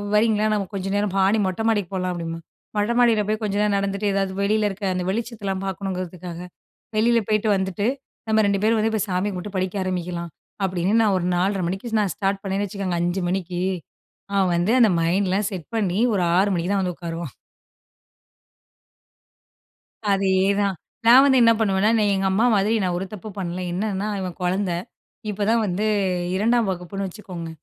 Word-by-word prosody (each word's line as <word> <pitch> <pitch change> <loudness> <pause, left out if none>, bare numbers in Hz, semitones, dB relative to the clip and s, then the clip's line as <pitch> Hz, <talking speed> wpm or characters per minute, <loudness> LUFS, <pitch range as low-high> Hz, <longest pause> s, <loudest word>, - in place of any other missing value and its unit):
"வரீங்களா 215 0 +3
நம்ம 205 -2 0
கொஞ்சம் 195 0 -2
நேரம் 205 -2 0
மாடி 195 +3 +3
மொட்டை 185 +4 -2
மாடிக்கு 205 -5 0
போகலாம்" 185 -1 -1
அப்படிம்பாங்க. 165 -1 -5 0.3
மொட்டை 210 +3 +1
மாடியில 230 -3 +4
போய் 215 +1 -1
கொஞ்ச 205 -1 -1
நேரம் 210 -1 +2
நடந்துட்டு 200 +1 -1
எதாவது 195 -1 0
வெளியில் 210 +1 +2
இருக்கிற 200 0 -4
அந்த 180 - -1
வெளிச்சத்தலாம் 205 -3 -3
பார்க்கணுங்கிறதுக்காக. 185 -2 -5 0.6
வெளியில 235 +2 +4
போய்ட்டு 215 0 +2
வந்துட்டு, 190 +2 -1 0.4
நம்ம 220 0 +4
2 200 -1 +1
பேரும் 225 +1 +4
இப்ப 215 - +2
வந்து 220 0 +1
போய் 215 0 -1
சாமியை 185 +3 0
கும்பிட்டு 190 +2 -6
படிக்க 185 +1 -1
ஆரம்பிக்கலாம், 175 -2 -3 0.3
அப்படின்னு 185 +1 0
நான் 205 -3 +3
ஒரு 175 - -2
4:30 190 +1 +1
மணிக்கு 220 +5 -2
நான் 200 -3 -1
ஸ்டார்ட் 195 -1 -1
பண்ணேன்னு 195 +1 -1
வச்சுக்கோங்க, 185 -3 -3
5:00 175 +2 -1
மணிக்கு 180 -1 -2 0.7
அவன் 190 -2 +3
வந்து 175 +5 +1
அந்த 230 -3 +6
மைண்ட்லாம் 190 +4 +1
செட் 180 -6 -6
பண்ணி 195 -5 0 0.2
ஒரு 185 - +1
6:00 195 +2 +3
மணிக்கு 175 +1 -1
தான் 200 -1 +2
வந்து 180 -1 -1
உட்காருவான். 165 -4 -6 2.8
அதேதான் 195 0 +2 0.3
நான் 250 +3 +9
வந்து 265 -2 +5
என்ன 230 0 +7
பண்ணுவேன்னா, 205 -1 +2
நீ - - +2
எங்க 195 0 0
அம்மா 210 +5 +2
மாதிரி, 205 +2 +2
நான் 180 -2 0
ஒரு 180 - -2
தப்பும் 210 0 -8
பண்ணல. 180 -1 -3
என்னன்னா, 200 +2 -2
இவன் 185 -2 -4
குழந்தை, 180 0 0 0.5
இப்பதான் 210 +3 +1
வந்து 190 +2 -1 0.5
2ஆம் 225 +3 +2
வகுப்புன்னு 190 +2 -4
வச்சுக்கோங்க. 180 -3 -8
195 Hz, 170 wpm, -23 LUFS, 185-210 Hz, 2.8 s, நான்